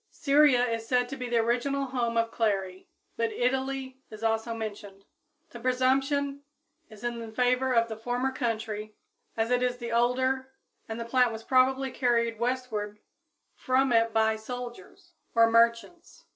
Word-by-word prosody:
Syria 280 -4 +4
is 230 -1 -3
said 250 0 +2
to 275 - -5
be 250 -2 -5
the 240 - +1
original 245 +5 0
home 240 -3 -2
of 230 0 +1
clary, 195 -4 -2 0.3
but 230 -1 0
Italy 265 +1 -2
is 215 +1 -10
also 225 +1 0
mentioned. 205 -3 -7 0.5
The 240 - -9
presumption 270 +3 +1 0.5
is 215 0 -14
in 235 -2 -4
favor 255 +1 +2
of 230 0 +3
the 220 - -5
former 245 +4 -2
country, 220 -4 -3 0.4
as 225 +2 0
it 250 0 +2
is 250 0 0
the 235 -1 -6
older, 260 +3 +1 0.4
and 220 +1 -4
the 230 - -4
plant 250 0 +3
was 225 0 -7
probably 260 +1 +2
carried 235 -3 0
westward 235 -4 -2 0.6
from 260 -1 +1
it 230 0 +3
by 220 0 +2
soldiers 245 - -9 0.2
or 230 0 +5
merchants. 235 +9 +1
240 Hz, 155 wpm, -28 LUFS, 225-260 Hz, 0.6 s, or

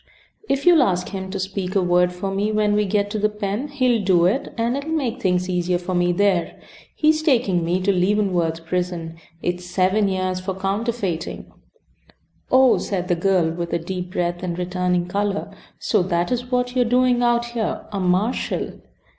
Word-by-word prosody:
If 275 0 0
you'll 345 -4 +7
ask 180 -7 +1
him 190 -1 -5
to 195 0 -4
speak 190 0 -4
a 195 - +4
word 180 0 +3
for 180 +2 -4
me 205 +2 0
when 210 -1 +2
we 210 0 +2
get 205 +1 0
to 215 - -2
the 210 +1 +2
pen 210 +5 -3
he'll 255 -6 +1
do 180 -3 +4
it, 210 +10 0
and 230 +2 0
it'll 280 +3 -4
make 265 -6 -1
things 180 -3 +1
easier 180 -1 0
for 180 +1 -5
me 175 0 +2
there. 185 -2 +1 0.4
He's 310 0 +3
taking 235 - +2
me 175 +2 0
to 195 +2 +2
Leavenworth 180 -4 0
prison. 175 -2 -3 0.3
It's 175 0 -2
seven 190 +3 +1
years 185 -1 -1
for 185 0 -4
counterfeiting." 195 -2 -3 1.0
"Oh!" 260 -1 +5
said 180 -2 -3
the 175 - +3
girl, 175 -2 +2
with 170 0 -4
a - - +3
deep 180 +2 -5
breath 175 0 -1
and 175 -2 -3
returning 180 0 0
color. 200 +2 -2 0.3
"So - - +1
that 175 -1 -1
is 245 0 -2
what 250 0 0
you 255 - +3
are - - +3
doing 245 +1 +3
out 240 0 +2
here? 225 -3 -2
A 200 - -2
marshal!" 185 +6 -1
190 Hz, 190 wpm, -22 LUFS, 180-225 Hz, 1.0 s, you'll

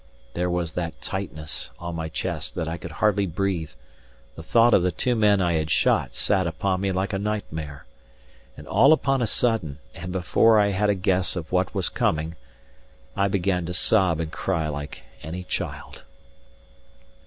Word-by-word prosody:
There 90 +1 -1
was 90 -2 -1
that 85 -1 -4
tightness 80 -6 -5
on 85 0 -6
my 80 -1 -3
chest - - -3
that 80 - -2
I 80 +1 -3
could 85 - -7
hardly 100 +3 +2
breathe; 90 -2 -1 0.6
the 80 - -9
thought 115 +8 +4
of - - +6
the 90 +1 +1
two 125 +8 0
men 105 -3 +4
I 85 -1 +1
had 80 -1 0
shot - - +2
sat 95 -3 +1
upon 95 +3 -1
me 100 -1 0
like 95 +2 -1
a 95 - 0
nightmare; 80 -9 -4 0.7
and - - -11
all 140 +4 +6
upon 135 -4 +1
a 120 - +1
sudden, 105 - 0 0.2
and 85 +1 -7
before 95 +5 +4
I 100 -1 +4
had 105 +2 +1
a 100 - +3
guess 95 -1 +1
of 85 -3 -5
what 95 +2 0
was 95 -3 0
coming, 80 +1 0 0.8
I 100 - +2
began 95 -3 0
to 90 - -3
sob 90 -3 +3
and 80 -1 -3
cry 80 -2 -1
like 70 -1 -6 0.2
any 90 +3 -6
child. - - -5
90 Hz, 175 wpm, -25 LUFS, 80-100 Hz, 0.8 s, of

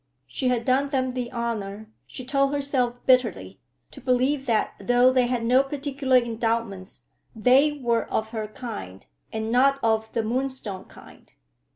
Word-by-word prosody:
She 260 - -3
had 240 -2 0
done 270 +2 +2
them 260 -2 -1
the 245 -1 -4
honor, 220 -3 -4 0.2
she 255 - -9
told 275 +1 +1
herself 275 -4 0
bitterly, 255 -1 +2 0.3
to - - -12
believe 260 +2 +1
that 225 -3 +1
though 245 +1 +4
they 255 -1 +2
had 240 -2 -1
no 250 +3 +5
particular 275 -1 0
endowments, 225 -5 -2 0.3
they 260 +7 +4
were 240 -5 0
of 220 0 -1
her 220 -2 -4
kind, 210 - -8 0.3
and 220 0 -3
not 275 +3 +4
of 220 -1 +1
the 230 - 0
Moonstone 240 -5 -3
kind. - - -16
245 Hz, 155 wpm, -25 LUFS, 225-265 Hz, 0.3 s, no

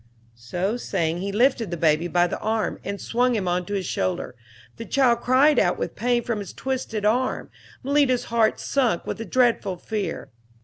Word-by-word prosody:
So 175 - -3
saying 165 -7 -1
he 200 +2 -3
lifted 230 0 +2
the 175 - -4
baby 160 +1 +2
by 175 0 +3
the 175 - -3
arm 220 0 -1
and 200 0 -4
swung 245 +1 +1
him 195 -4 -1
on 180 0 -1
to 205 - -3
his 190 -2 -2
shoulder. 175 -6 -2 0.4
The 230 - -7
child 240 -3 +2
cried 270 +5 +4
out - - +2
with - - -4
pain 240 0 +1
from 225 -3 -2
its 195 - -8
twisted 255 -5 -3
arm. 245 +5 0 0.3
Malita's 275 -2 +2
heart 225 -2 +3
sunk 245 -10 0
with - - -4
a - - -4
dreadful 225 -4 +1
fear. 200 -3 -4
220 Hz, 185 wpm, -24 LUFS, 180-245 Hz, 0.4 s, cried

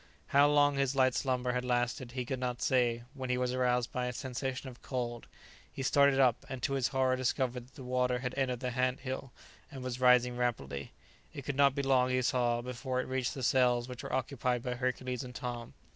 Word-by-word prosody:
How 140 +1 +6
long 145 -1 +4
his 140 0 +1
light 130 -1 +4
slumber 125 -2 0
had 125 0 -1
lasted 125 0 -1
he 125 -1 -3
could 130 0 -3
not 125 -1 -2
say, 120 -2 +2
when 130 -3 -5
he 125 - +1
was 125 0 0
aroused 125 -1 +1
by 125 -1 -2
a 125 - -3
sensation 130 +1 -4
of 125 -2 -10
cold. 120 -3 -4 0.4
He 135 - -5
started 140 0 +4
up, 125 -3 +3
and 130 -2 -6
to 140 - 0
his 135 -3 +1
horror 130 -1 +2
discovered 125 -1 -1
that - - -25
the 135 - -9
water 125 0 +1
had 125 0 -4
entered 130 -3 -1
the 125 -1 -2
ant 125 +1 0
hill 130 -1 -5 0.4
and 135 -4 -8
was 130 -1 -4
rising 125 -1 +5
rapidly; 70 - -2 0.4
it 140 - -6
could 140 - -3
not 140 -1 +4
be 140 - -1
long, 130 -2 +3
he 130 0 +1
saw, 120 -1 +1
before 125 +1 -3
it - - -1
reached 130 -2 -2
the 130 - -5
cells 125 -1 +3
which 125 -1 -7
were - - -6
occupied 125 -2 -1
by 125 - -2
Hercules 125 +1 -2
and 125 -1 -9
Tom. 120 -1 -5
125 Hz, 220 wpm, -32 LUFS, 125-130 Hz, 0.4 s, How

